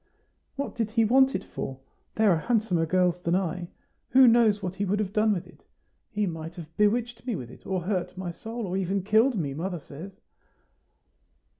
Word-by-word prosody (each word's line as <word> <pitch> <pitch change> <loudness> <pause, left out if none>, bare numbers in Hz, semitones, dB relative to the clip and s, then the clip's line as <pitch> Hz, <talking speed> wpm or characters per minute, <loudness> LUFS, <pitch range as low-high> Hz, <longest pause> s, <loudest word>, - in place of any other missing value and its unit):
"What 280 0 -3
did 225 -3 -1
he 225 0 +2
want 265 +4 +4
it 190 - -2
for? 130 0 -6 0.4
There 215 -2 +4
are 170 - +4
handsomer 205 -7 +1
girls 180 0 +2
than 170 0 +1
I. 180 -2 -1 0.4
Who 260 +1 +7
knows 230 -3 +5
what 180 -1 -2
he 195 +2 -3
would 200 +1 +1
have 205 -2 -2
done 215 0 +3
with 185 -5 -1
it? - - -19 0.5
He 210 -2 -1
might 165 -1 -5
have 165 -2 -10
bewitched 230 +3 +1
me 240 - 0
with 125 -7 -7
it, - - -14
or 190 -2 -1
hurt 180 -1 -2
my 185 -2 -4
soul, 225 +6 -6
or 185 -1 -3
even 195 0 -1
killed 220 +6 +4
me, 145 -6 -2
mother 175 +4 -3
says." 160 +7 -11
195 Hz, 195 wpm, -27 LUFS, 175-220 Hz, 0.5 s, Who